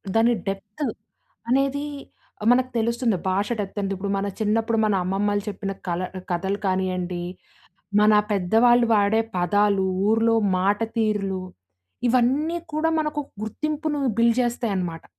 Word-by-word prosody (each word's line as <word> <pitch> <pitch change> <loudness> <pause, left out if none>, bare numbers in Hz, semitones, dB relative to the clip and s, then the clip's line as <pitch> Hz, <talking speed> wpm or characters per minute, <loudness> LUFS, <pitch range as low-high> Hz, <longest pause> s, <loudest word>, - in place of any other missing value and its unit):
దాని 230 +2 +4
డెప్త్ 200 +7 -4 0.7
అనేదీ 275 +2 +1 0.7
మనకు 255 +1 +3
తెలుస్తుంది, 230 -2 +1
భాష 200 +2 0
డెప్తెంతిప్పుడు. 195 0 -3
మన 195 - -1
చిన్నప్పుడు, 225 +1 +1
మన 210 - +2
అమ్మమ్మలు 205 +2 0
చెప్పిన 200 -1 -4 0.2
కల 175 0 -1 0.2
ఆహ్, 185 - -8
కథలు 190 +3 -1
కాని‌యండీ. 185 -2 -1 0.8
మన 215 0 +5 0.2
పెద్దవాళ్ళు 230 +5 +4
వాడే 205 +1 +3 0.2
పదాలు, 200 +2 +2 0.2
ఊరులో 225 +1 +3 0.2
మాటతీరులు, 205 -1 0 0.7
ఇవన్నీ 265 +7 +2 0.2
కూడా 310 +1 +1
మనకు 300 -1 -2 0.2
గుర్తింపును 300 +6 -2 0.2
బిల్డ్ 235 +1 +4
చేస్తాయనమాట. 195 -9 -2
210 Hz, 110 wpm, -24 LUFS, 195-240 Hz, 0.8 s, మన